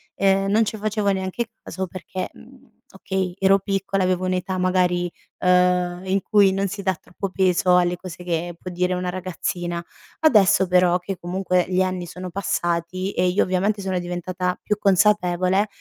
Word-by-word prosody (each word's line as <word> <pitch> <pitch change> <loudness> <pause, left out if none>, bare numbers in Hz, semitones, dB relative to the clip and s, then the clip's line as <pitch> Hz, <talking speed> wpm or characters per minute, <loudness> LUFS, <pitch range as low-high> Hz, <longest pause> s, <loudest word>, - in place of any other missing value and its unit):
ehm, 195 0 +2
non 220 +1 +4
ci 220 - -3
facevo 210 -1 0
neanche 190 +5 -3 0.2
caso 190 -1 -4
perché, 185 +1 -6
mhmm, - - -18
okay, 190 -2 -3
ero 195 0 +4
piccola 195 -1 -1
avevo 185 0 0
un'età 185 0 -1
magari, 180 -1 +1 0.3
uhm, 180 -1 +2
in 190 +1 +1
cui 205 -3 +4
non 195 +1 0
si 200 +1 -5
dà 190 -1 +1
troppo 185 +4 -6
peso 185 -1 +3
alle 175 0 +2
cose 180 -1 -9
che 170 0 -2
può 185 - -7
dire 180 +1 0
una 180 0 -2
ragazzina; 175 -1 -3 0.4
adesso, 205 - +5
però 180 -1 +4
che 185 +1 -5
comunque 180 0 0
gli 185 0 +2
anni 185 -1 -1
sono 180 +1 -7
passati 180 0 -2
e 180 - +1
io, 180 +3 +2
ovviamente, 195 +3 0
sono 190 -1 -2
diventata 180 +1 -3
più 210 - 0
consapevole, 190 -1 +3
185 Hz, 165 wpm, -22 LUFS, 180-195 Hz, 0.4 s, adesso